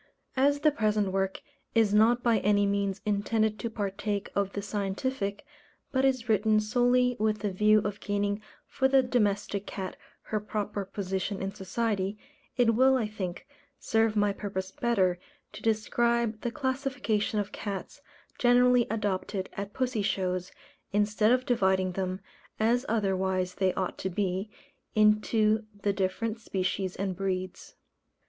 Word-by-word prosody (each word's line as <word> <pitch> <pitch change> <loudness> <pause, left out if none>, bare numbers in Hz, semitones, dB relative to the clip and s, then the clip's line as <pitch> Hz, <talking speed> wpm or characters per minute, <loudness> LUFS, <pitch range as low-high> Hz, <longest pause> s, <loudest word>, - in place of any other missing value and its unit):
As 285 +2 +3
the 305 - +5
present 215 -6 +1
work 195 0 -1 0.3
is 220 -3 +4
not 230 +3 +4
by 230 -2 +3
any 205 0 +3
means 200 -1 -1
intended 215 +1 +1
to 230 - -3
partake 205 -1 -3
of 200 -1 0
the 200 - -3
scientific, 205 +3 -2 0.5
but 260 -1 +1
is 255 -3 +1
written 215 0 +3
solely 245 +3 +2
with 215 -1 +1
the 205 -2 -1
view 210 +3 +4
of 205 0 -3
gaining 205 0 -1 0.2
for 265 - +1
the 265 0 +4
domestic 205 -4 0
cat 190 -2 -5 0.3
her 215 - -2
proper 210 -1 -3
position 195 0 -3
in 195 +1 -3
society, 200 0 -2 0.4
it 240 -2 +4
will, 260 +3 +5
I 225 -4 0
think, 190 -4 -6 0.3
serve 225 -1 +1
my 205 -1 +2
purpose 190 -2 -4
better 190 -7 +1 0.3
to - - -9
describe 225 0 +1
the 240 - -1
classification 260 -5 -1
of 205 -1 -3
cats 200 -3 -6 0.4
generally 245 0 +5
adopted 205 -2 -2
at 200 +1 -5
pussy 255 -3 -1
shows, 185 -2 -1 0.4
instead 210 +2 +2
of 255 0 +2
dividing 190 -5 +2
them, 185 +1 -3 0.4
as 240 +4 +2
otherwise 190 -4 0
they 190 0 +1
ought 185 - -2
to 190 - -2
be, 190 +2 -2 0.5
into 215 +1 +3 0.2
the 200 - +2
different 200 +4 -1
species 190 -3 -2
and 190 -1 -2
breeds. 185 -1 -4
210 Hz, 145 wpm, -29 LUFS, 195-230 Hz, 0.5 s, the